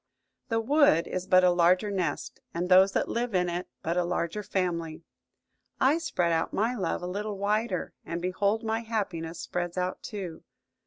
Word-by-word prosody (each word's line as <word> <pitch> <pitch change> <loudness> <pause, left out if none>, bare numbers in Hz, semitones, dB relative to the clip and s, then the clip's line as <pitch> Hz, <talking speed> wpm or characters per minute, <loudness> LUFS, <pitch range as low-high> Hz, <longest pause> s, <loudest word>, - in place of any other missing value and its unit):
The 225 -1 +1
wood 245 - +4
is 185 0 -4
but 185 -1 +6
a 180 - +6
larger 180 +4 +3
nest, 180 -7 -2 0.2
and 175 +2 -1
those 190 +1 +6
that - - +1
live 235 -2 -2
in 180 -1 +2
it 175 +1 -3 0.2
but 170 +1 -1
a 180 - +3
larger 175 +3 -2
family. 170 -5 -2 0.8
I 275 +5 +4
spread 270 - 0
out 165 0 0
my 225 +4 +1
love 195 -5 -2
a - - -2
little 205 +3 -3
wider, 205 -1 -1
and 170 - -4
behold 200 +5 0
my 225 0 0
happiness 195 -8 -3
spreads 175 0 -3
out 180 0 -2
too! 185 -7 -6
185 Hz, 175 wpm, -28 LUFS, 175-215 Hz, 0.8 s, but